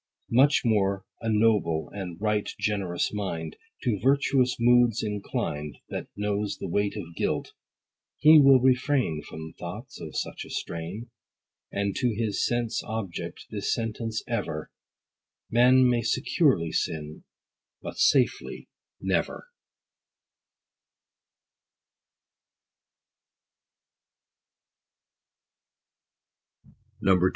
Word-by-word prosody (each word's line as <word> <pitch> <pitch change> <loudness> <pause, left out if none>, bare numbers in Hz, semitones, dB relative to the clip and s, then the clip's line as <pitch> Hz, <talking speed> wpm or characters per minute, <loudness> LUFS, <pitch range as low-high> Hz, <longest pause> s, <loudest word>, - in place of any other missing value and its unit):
Much 135 +5 +5
more 100 -4 +1 0.2
a 115 - -2
noble, 105 -7 +2
and 90 -4 -6
right 105 0 0
generous 100 -4 -1
mind, 85 -6 -4 0.3
To 115 -7 0
virtuous 135 -1 +3
moods 120 -1 +4
inclined 100 -8 -3
That - - -5
knows 105 0 -2
the - - -5
weight 100 +3 0
of 85 0 -7
guilt; - - -2 0.6
he 155 0 +8
will 135 -2 +7
refrain 130 - +2
From 80 0 -9
thoughts - - -8
of - - -6
such - - -4
a - - -12
strain, 90 +9 -5 0.6
And 100 -1 -1
to 120 -4 +1
his 110 -2 -1
sense 120 -2 0
object 110 -6 -5
this 100 -2 -2
sentence 115 0 -3
ever, 75 0 -3 0.8
"Man 125 +2 +6
may 120 -1 +2
securely 110 - +1
sin, 75 -3 -3 0.6
but - - -7
safely - - +2 0.3
never." - - -2
105 Hz, 90 wpm, -27 LUFS, 95-120 Hz, 0.8 s, he